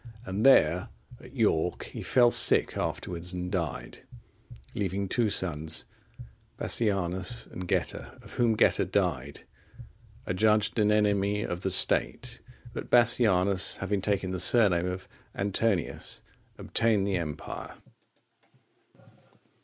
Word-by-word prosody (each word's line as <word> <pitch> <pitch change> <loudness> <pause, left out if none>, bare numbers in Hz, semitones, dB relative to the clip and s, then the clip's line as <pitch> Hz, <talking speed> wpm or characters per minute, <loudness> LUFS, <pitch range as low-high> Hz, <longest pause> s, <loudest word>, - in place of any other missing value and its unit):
And 95 +3 -3
there, 90 - +4 0.3
at 130 - -15
York, 90 -8 0
he - - -8
fell 120 -2 +3
sick - - +5
afterwards 90 0 -4
and 90 0 -5
died, 85 -5 -5 0.7
leaving 100 0 -3
two 115 +3 0
sons, 80 -5 0 0.7
Bassianus 95 +1 -1
and 90 0 -9
Geta;(45) - - -4
of - - -13
whom 115 -2 +1
Geta - - +2
died, 70 +3 -2 0.8
adjudged 105 +4 +1
an 105 0 +2
enemy 105 -1 +1
of 90 0 -5
the 95 - -1
State; 120 +6 +3 0.3
but - - -7
Bassianus, 100 -6 +3
having 95 0 -3
taken 100 -2 -2
the 95 - -4
surname 90 -3 +3
of 90 +1 -6 0.3
Antonius, 100 -1 -2 0.3
obtained 110 -4 0
the 100 -2 -1
empire. 75 -4 -7
95 Hz, 115 wpm, -27 LUFS, 90-110 Hz, 0.8 s, sick